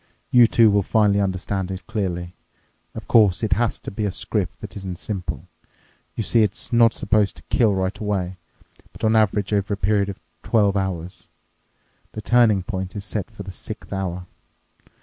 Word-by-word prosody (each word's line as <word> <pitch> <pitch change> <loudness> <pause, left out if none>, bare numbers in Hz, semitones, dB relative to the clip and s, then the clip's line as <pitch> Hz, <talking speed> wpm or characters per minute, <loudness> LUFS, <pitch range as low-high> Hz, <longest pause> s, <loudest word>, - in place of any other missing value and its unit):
You 120 -2 +7
too 115 -1 +5
will 100 0 +3
finally 100 0 +2
understand 95 0 -2
it 95 0 -6
clearly. 90 -5 -3 0.6
Of - - -8
course, 105 -3 +4
it 110 - +2
has 120 -2 0
to - - -7
be 105 +2 -4
a 100 - -1
script 95 +1 -3
that 105 - -9
isn't 95 -3 -6
simple. 95 -2 -5 0.7
You 110 - -2
see, 115 +2 +3
it's 105 +2 -1
not 115 -1 +5
supposed 105 -1 +1
to - - -15
kill 110 -5 +3
right 95 +1 -1
away, 95 -3 -2 0.6
but - - -14
on 110 0 +3
average 105 -1 +2
over 100 0 0
a - - -18
period 100 +1 +1
of 100 - -7 0.2
twelve 105 -3 +2
hours. 95 -3 -4 0.8
The 110 - -6
turning 115 -6 +4
point 95 -1 -5
is 100 -1 -5
set 105 -2 -4
for 105 -2 -9
the 95 - -8
sixth 95 - -8
hour. 90 -2 -3
100 Hz, 180 wpm, -22 LUFS, 95-110 Hz, 0.8 s, You